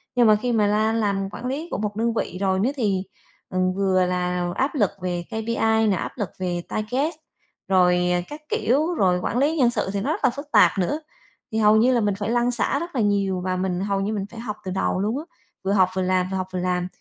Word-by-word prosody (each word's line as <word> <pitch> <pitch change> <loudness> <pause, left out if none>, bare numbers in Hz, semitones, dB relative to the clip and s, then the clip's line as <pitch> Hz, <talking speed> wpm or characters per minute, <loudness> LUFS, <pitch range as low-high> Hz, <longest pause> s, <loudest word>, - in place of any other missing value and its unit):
Nhưng 240 -2 +5
mà 215 - +7
khi 245 +3 -1
mà 210 -3 +3
la 215 +2 +2
làm 200 -3 0
quản 245 - -7
lý 285 +6 -3
của - - -1
một 210 -1 -3
đơn 230 +1 0
vị 180 - -3
rồi 190 -1 +1
đó 235 +7 +2
thì, 200 -7 0 0.5
ừm, 185 0 0
vừa 190 -1 +2
là 180 -1 -1
áp 270 +4 0
lực 210 -9 +3
về 175 -1 -2
KPI 220 0 +1
nè, 195 - +3
áp - - -4
lực 205 -7 -2
về 175 -2 -2
target, 255 +10 -1 0.5
rồi, 180 -1 +3
à, 180 0 +1
các 300 +1 -8
kiểu, 300 +9 +1
rồi 180 -5 +2
quản 245 - -1
lý 300 +5 +2
nhân 245 -3 +4
sự 195 - -2
thì 200 - -1
nó - - -1
rất - - -2
là - - +5
phức 285 +4 -8
tạp 210 - +6
nữa. 295 - 0 0.5
Thì 220 - -2
hầu 215 0 +5
như 245 +4 +4
là 235 - +2
mình 205 -2 +1
phải 205 +2 -3
lăn 240 +1 +2
xả 260 +3 0
rất 340 -3 -6
là 235 - +2
nhiều 200 -3 +1
và 185 0 -1
mình 185 -1 -1
hầu 200 -1 0
như 210 +2 -1
mình 200 -2 -2
phải 230 - -9
học 215 -3 -5
từ 185 - -3
đầu 185 0 0
luôn 215 +6 0
á, - - -6 0.4
vừa 195 - 0
học 185 -2 +4
vừa 190 - 0
làm, 185 0 +1
vừa 190 - -1
học 185 0 -3
vừa 185 - -1
làm, 180 0 -1
205 Hz, 260 wpm, -23 LUFS, 185-235 Hz, 0.5 s, mà